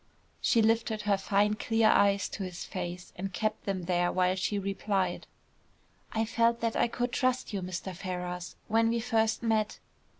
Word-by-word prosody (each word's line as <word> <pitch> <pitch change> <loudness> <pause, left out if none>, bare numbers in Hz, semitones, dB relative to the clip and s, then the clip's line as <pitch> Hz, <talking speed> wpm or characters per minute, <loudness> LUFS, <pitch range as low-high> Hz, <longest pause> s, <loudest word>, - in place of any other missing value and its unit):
She 230 -3 +4
lifted 225 -1 +1
her 205 -1 +3
fine 200 +2 +2
clear 225 +1 +2
eyes 200 0 +4
to - - -6
his 180 -2 -5
face 180 -1 -6
and 190 +2 -4
kept 215 +4 -2
them 195 -2 -2
there 175 0 +1
while 185 0 +2
she 195 +2 -1
replied. 195 -2 -1 0.8
"I 225 0 0
felt 230 +1 +2
that 230 -1 0
I - - +3
could 245 +1 -2
trust 255 -3 0
you, 195 - -1
Mr. 185 +1 -5
Ferrars, 180 -1 -5
when 225 +1 +3
we 235 0 +1
first 225 -1 +1
met. 220 -2 +1
205 Hz, 170 wpm, -30 LUFS, 185-225 Hz, 0.8 s, She